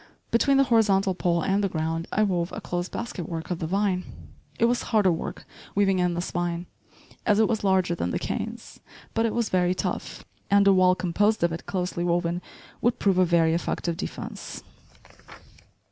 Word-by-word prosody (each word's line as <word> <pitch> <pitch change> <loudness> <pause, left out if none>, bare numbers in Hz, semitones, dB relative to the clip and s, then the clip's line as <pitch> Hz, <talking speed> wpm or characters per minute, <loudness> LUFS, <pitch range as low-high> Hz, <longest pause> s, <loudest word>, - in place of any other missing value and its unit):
Between 270 +4 +3
the 275 - +6
horizontal 205 -6 +3
pole 170 -2 0
and 200 +1 +1
the 195 - +1
ground, 165 0 -2
I 215 - +2
wove 180 -4 0
a - - -4
close 175 +1 -3
basketwork 170 -7 -5
of 175 - -2
the 160 - -2
vine. 190 0 0 0.5
It 230 - +3
was 240 +1 +2
harder 210 -5 +3
work 165 - -5 0.3
weaving 195 -2 +3
in 180 -1 +1
this 175 +1 -3
vine, 175 0 -2 0.6
as 210 -1 +3
it 220 - +5
was 220 -3 -1
larger 190 -3 +2
than 90 - -2
the - - -1
canes; - - -5 0.3
but 225 0 +2
it 220 - -3
was 235 -2 0
very 180 0 +2
tough, - - -4 0.2
and 200 0 +5
a 200 - +6
wall 185 -1 +5
composed 205 +4 +1
of 170 - +3
it 165 - -6
closely 180 -2 -2
woven 175 0 0 0.4
would 240 +1 +2
prove 195 -5 +2
a 185 - +5
very 165 -2 +3
effective 170 0 -1
defense. 180 - -6
185 Hz, 185 wpm, -26 LUFS, 170-205 Hz, 0.6 s, the